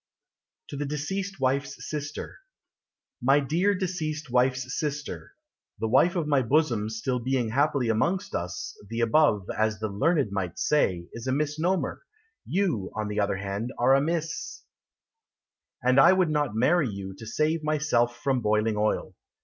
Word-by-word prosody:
TO 140 Hz, -, -7 dB
THE 145 Hz, 0 st, -2 dB
DECEASED 190 Hz, +6 st, -3 dB
WIFE'S 135 Hz, +2 st, -1 dB
SISTER 150 Hz, -1 st, -5 dB, 0.8 s
My 135 Hz, +4 st, +4 dB
dear 170 Hz, +8 st, +1 dB
Deceased 160 Hz, -7 st, -3 dB
Wife's 130 Hz, +1 st, +1 dB
Sister, 145 Hz, -1 st, -4 dB, 0.4 s
(The 110 Hz, -, -2 dB
wife 135 Hz, +10 st, +4 dB
of 170 Hz, -3 st, 0 dB
my 145 Hz, -3 st, +3 dB
bosom 120 Hz, -4 st, +1 dB
being -, -, -4 dB
still 120 Hz, +2 st, -2 dB, 0.3 s
happily 140 Hz, -1 st, +1 dB
amongst 180 Hz, -, 0 dB
us, 325 Hz, +1 st, -4 dB
The 115 Hz, +1 st, -2 dB
above, 115 Hz, -5 st, +3 dB
As 110 Hz, 0 st, +1 dB
the 110 Hz, +1 st, -3 dB
learned 135 Hz, -, +1 dB
might 95 Hz, -4 st, -3 dB
say, 90 Hz, -13 st, +1 dB
Is 115 Hz, +2 st, -7 dB
a -, -, +1 dB
misnomer. 150 Hz, +6 st, -1 dB, 0.5 s
You, 170 Hz, -, 0 dB
on 105 Hz, -1 st, -2 dB
the 105 Hz, 0 st, -2 dB
other 100 Hz, -1 st, +1 dB
hand, 100 Hz, +5 st, -4 dB
Are 125 Hz, +2 st, +4 dB
a 135 Hz, -, +5 dB
Miss, 165 Hz, -, -3 dB, 1.2 s
And 130 Hz, +2 st, +4 dB
I 170 Hz, +6 st, +8 dB
would 185 Hz, -4 st, +2 dB
not 145 Hz, -7 st, 0 dB
marry 140 Hz, +4 st, +3 dB
you 95 Hz, -1 st, -6 dB
To 110 Hz, -, -9 dB
save 155 Hz, +6 st, 0 dB
myself 145 Hz, -6 st, +1 dB
from 135 Hz, -3 st, +1 dB
boiling 105 Hz, 0 st, +1 dB
oil. 105 Hz, +1 st, 0 dB
135 Hz, 155 wpm, -27 LUFS, 110-155 Hz, 1.2 s, I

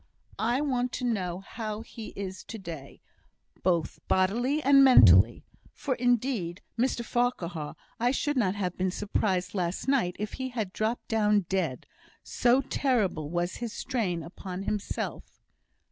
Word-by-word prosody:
I 240 Hz, +5 st, +1 dB
want 250 Hz, -4 st, 0 dB
to -, -, -4 dB
know 185 Hz, -6 st, -1 dB
how 215 Hz, +1 st, -5 dB
he 225 Hz, -1 st, -9 dB
is 190 Hz, -1 st, -6 dB
to 225 Hz, -, -7 dB
day, 165 Hz, -8 st, -9 dB, 0.6 s
both 170 Hz, -4 st, 0 dB
bodily 235 Hz, +10 st, +2 dB
and 275 Hz, 0 st, +7 dB
mentally; 110 Hz, -, +7 dB, 0.3 s
for 275 Hz, -, -2 dB
indeed, 245 Hz, -7 st, 0 dB
Mr 240 Hz, 0 st, 0 dB
Farquhar, 175 Hz, -12 st, -1 dB, 0.2 s
I 240 Hz, +2 st, +3 dB
should 290 Hz, +3 st, 0 dB
not 205 Hz, -7 st, +1 dB
have 185 Hz, -3 st, -2 dB
been 185 Hz, 0 st, 0 dB
surprised 190 Hz, -1 st, -1 dB
last 180 Hz, +3 st, -2 dB
night 245 Hz, -10 st, +2 dB
if 210 Hz, 0 st, -4 dB
he 260 Hz, 0 st, -4 dB
had 220 Hz, -6 st, -4 dB
dropped 220 Hz, +3 st, -2 dB
down 210 Hz, -2 st, +3 dB
dead, 175 Hz, -8 st, -2 dB, 0.4 s
so 245 Hz, +2 st, +3 dB
terrible 215 Hz, -, 0 dB
was 175 Hz, +2 st, -2 dB
his 235 Hz, -3 st, -5 dB
strain 195 Hz, -, -2 dB
upon 185 Hz, +3 st, -7 dB
himself." 210 Hz, 0 st, -4 dB
210 Hz, 145 wpm, -28 LUFS, 180-245 Hz, 0.6 s, and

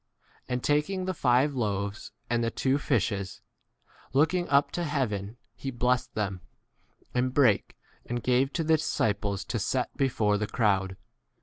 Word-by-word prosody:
And 125 Hz, -1 st, -2 dB
taking 150 Hz, +6 st, +1 dB
the 185 Hz, -, -1 dB
five 130 Hz, -1 st, +3 dB
loaves 100 Hz, -4 st, -2 dB, 0.2 s
and 120 Hz, 0 st, 0 dB
the 115 Hz, -, +1 dB
two 135 Hz, +4 st, 0 dB
fishes, 100 Hz, -8 st, -1 dB, 0.7 s
looking 160 Hz, +6 st, +2 dB
up 140 Hz, 0 st, +3 dB
to 175 Hz, -, -2 dB
heaven 120 Hz, -, -2 dB, 0.2 s
he 120 Hz, +3 st, -5 dB
blessed 125 Hz, 0 st, 0 dB
them, 100 Hz, -4 st, -2 dB, 0.7 s
and 125 Hz, +1 st, +1 dB
brake 125 Hz, -8 st, +3 dB, 0.3 s
and 120 Hz, 0 st, -3 dB
gave 130 Hz, +2 st, +2 dB
to 165 Hz, -, 0 dB
the 160 Hz, 0 st, +4 dB
disciples 100 Hz, -, -1 dB
to 115 Hz, -, -2 dB
V -, -, -3 dB
set 125 Hz, +5 st, -1 dB
before 110 Hz, -6 st, +1 dB
the 105 Hz, -, -1 dB
crowd. 95 Hz, -4 st, +1 dB
125 Hz, 150 wpm, -28 LUFS, 105-140 Hz, 0.7 s, the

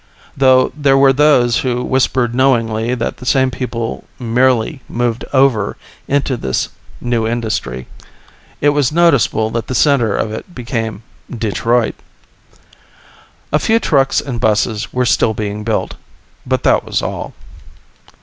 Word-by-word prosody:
(Though 130 Hz, -1 st, +4 dB
there 140 Hz, -2 st, +3 dB
were 135 Hz, 0 st, +5 dB
those 130 Hz, -5 st, +3 dB
who 125 Hz, -1 st, -1 dB
whispered 130 Hz, -2 st, +1 dB
knowingly 120 Hz, -2 st, +1 dB
that 120 Hz, -, -3 dB
the 125 Hz, -, -11 dB
same 130 Hz, -1 st, +2 dB
people 115 Hz, -3 st, -4 dB
merely 125 Hz, +2 st, +1 dB
moved 120 Hz, -1 st, -2 dB
over 130 Hz, -7 st, +2 dB, 0.3 s
into 140 Hz, -2 st, 0 dB
the 65 Hz, -, -1 dB, 0.4 s
new 120 Hz, -2 st, -1 dB
industry. 110 Hz, -, -3 dB, 0.8 s
It 145 Hz, -, +4 dB
was 145 Hz, -3 st, +1 dB
noticeable 140 Hz, -9 st, +2 dB
that 115 Hz, 0 st, -3 dB
the 130 Hz, -, -3 dB
center 120 Hz, -9 st, +3 dB
of 110 Hz, -, -2 dB
it 140 Hz, -, -8 dB
became 115 Hz, -4 st, -4 dB, 0.3 s
Detroit.) 115 Hz, +1 st, 0 dB, 1.6 s
A 150 Hz, -, +4 dB
few 225 Hz, +7 st, +2 dB
trucks 135 Hz, -9 st, +2 dB
and 125 Hz, -5 st, -5 dB
buses 110 Hz, 0 st, 0 dB
were 125 Hz, 0 st, 0 dB
still 110 Hz, -2 st, +2 dB
being 105 Hz, 0 st, -4 dB
built, 110 Hz, 0 st, -1 dB, 0.5 s
but -, -, 0 dB
that -, -, +3 dB
was -, -, -2 dB
all. -, -, -5 dB
120 Hz, 135 wpm, -16 LUFS, 110-135 Hz, 1.6 s, were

